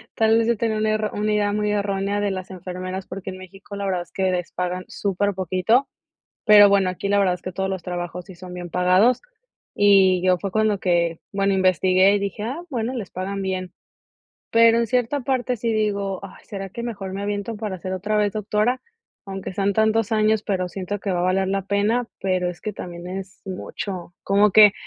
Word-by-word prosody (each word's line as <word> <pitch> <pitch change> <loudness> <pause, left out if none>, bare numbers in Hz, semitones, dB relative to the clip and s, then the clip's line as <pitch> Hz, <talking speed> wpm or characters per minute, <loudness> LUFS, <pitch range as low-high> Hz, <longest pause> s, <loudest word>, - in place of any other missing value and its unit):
tal 225 0 +4
vez, 230 - +2
yo 235 - +3
tenía 220 0 0
una 215 0 +1
erró 215 -1 0
una 210 +1 0
idea 205 -1 +2
muy 210 0 0
errónea 200 0 -1
de 205 -1 0
las 185 0 -5
enfermeras, 185 +1 -6
porque 190 0 -6
en 185 - -9
México, 195 +2 -11
la 200 - -4
verdad 185 -2 -1
es 175 - -26
que 190 -1 +1
les 180 -1 -2
pagan 180 0 -3
súper 200 0 -1
poquito. 185 - +1 0.6
Pero 205 -1 +9
bueno, 195 -2 +3
aquí 185 +2 -4
la 205 - +3
verdad, 190 -2 +3
es - - -14
que 185 - -5
todos 190 +2 -2
los 190 -2 -4
trabajos, 175 0 -4
sí 190 - -11
son 180 +1 -10
bien 175 -1 -6
pagados. 185 +8 +3 0.5
Y 195 -3 +5
yo, 185 -1 +4
fue 195 +1 -4
cuando 215 -1 +1
que 170 -3 +1
Bueno, 195 0 +2
investigué 185 +1 +4
y - - +1
dije: 200 +1 -4
"Ah, 265 +10 -4
bueno, 245 -2 -2
les 215 -7 -5
pagan 195 +2 -4
bien". 185 -2 -3 0.8
Pero 230 0 +6
en 235 - +1
cierta 250 +4 0
parte, 250 -1 0
sí 230 +1 -1
digo: 200 -3 -1
"Ay, 195 - -12
¿será 195 -2 -6
que 235 - -6
mejor 195 -5 -5
me 200 - -4
aviento, 205 +2 -3
para 210 -3 -4
ser 185 - -4
otra 205 +3 -1
vez 205 -1 +2
Doctora? 215 +4 0 0.5
Aunque 195 -1 -5
sean 200 0 +1
tantos 220 0 +2
años, 215 0 +3
pero 185 -4 -1
siento 195 +2 -4
que 195 -1 -2
va 175 - 0
a - - 0
valer 185 +1 +1
la 195 0 0
pena". 215 +4 +1
Pero 185 -2 0
es 175 - -11
que 215 - -3
también 175 -2 -8
es 190 +1 -7
mucho. 185 -1 -6
Como 200 +1 +4
que 210 -1 +8
195 Hz, 215 wpm, -23 LUFS, 185-215 Hz, 0.8 s, Pero